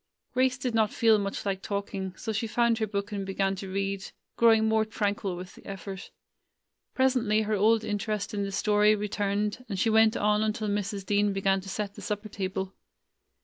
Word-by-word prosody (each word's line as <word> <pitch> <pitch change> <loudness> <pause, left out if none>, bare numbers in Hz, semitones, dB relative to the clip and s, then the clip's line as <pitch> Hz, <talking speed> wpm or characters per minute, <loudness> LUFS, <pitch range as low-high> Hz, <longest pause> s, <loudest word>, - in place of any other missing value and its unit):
Grace 255 0 +2
did 250 -2 -2
not 220 -2 +2
feel 225 -2 +4
much 200 0 -3
like 195 -1 -1
talking, 195 -2 -4
so 220 - -4
she 225 +2 -1
found 235 +1 +2
her 220 - 0
book 200 0 -3
and 200 -1 -3
began 195 0 0
to 190 0 -7
read, 195 0 -2 0.3
growing 225 -1 +5
more 220 0 +3
tranquil 205 -3 -2
with 180 +1 -8
the - - -16
effort. 195 0 -7 0.9
Presently 245 -5 +2
her 215 0 -1
old 220 +2 +3
interest 210 0 -2
in 205 - -1
the 200 0 -2
story 210 +2 +3
returned, 205 +2 -1
and 195 - -3
she 225 +4 +2
went 220 0 +5
on 210 0 +2
until 215 0 -1
Mrs. 200 -1 -2
Dean 205 0 +2
began 195 0 +1
to 195 - -9
set 200 0 -3
the - - -11
supper 210 +1 -4
table. 190 -1 -3
205 Hz, 190 wpm, -28 LUFS, 195-220 Hz, 0.9 s, growing